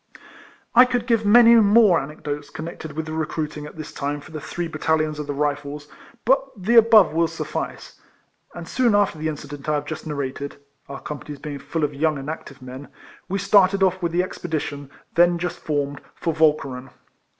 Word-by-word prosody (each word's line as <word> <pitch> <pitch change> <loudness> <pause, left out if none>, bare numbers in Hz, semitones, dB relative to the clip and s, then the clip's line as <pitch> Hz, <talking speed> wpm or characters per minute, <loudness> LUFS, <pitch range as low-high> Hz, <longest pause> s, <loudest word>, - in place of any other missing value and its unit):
I 245 - +9
could 245 -2 -1
give 230 -4 +1
many 235 +2 +8
more 215 -4 +6
anecdotes 145 0 -6
con 160 - -7
nected 160 -2 -8
with 160 +1 -4
the 155 - -6
recruiting 155 -1 -3
at - - -12
this 155 -1 -7
time 145 +1 -3
for 145 - -14
the 155 -2 -6
three 175 +3 -4
battalions 155 -1 -1
of 150 -1 -6
Rifles, 145 0 -2 0.4
but 270 +3 +4
the 205 +5 0
above 220 -7 +7
will 165 +1 +2
suffice; - - -6 0.5
and 170 -1 -8
soon 240 -2 +2
after 200 -6 +2
the 155 - -2
incident 145 -1 -6
I 150 - +2
have 145 0 -2
just 155 +1 -6
narrated 140 -1 -4 0.3
(our 135 - -7
companies 150 0 -7
being 145 0 -7
full 160 +3 -3
of 145 0 0
young 155 +1 0
and 140 +3 -4
active 140 -4 -10
men), 130 +2 -9 0.4
we 195 - -1
started 195 0 +4
off 185 0 +2
with 170 -1 -1
the 175 +2 +2
expedition, 150 -6 -5 0.2
then 175 0 +4
just 175 0 -4
formed, 145 -2 -2
for 165 - -2
Walcheren. 140 -5 +1
155 Hz, 185 wpm, -22 LUFS, 145-185 Hz, 0.5 s, I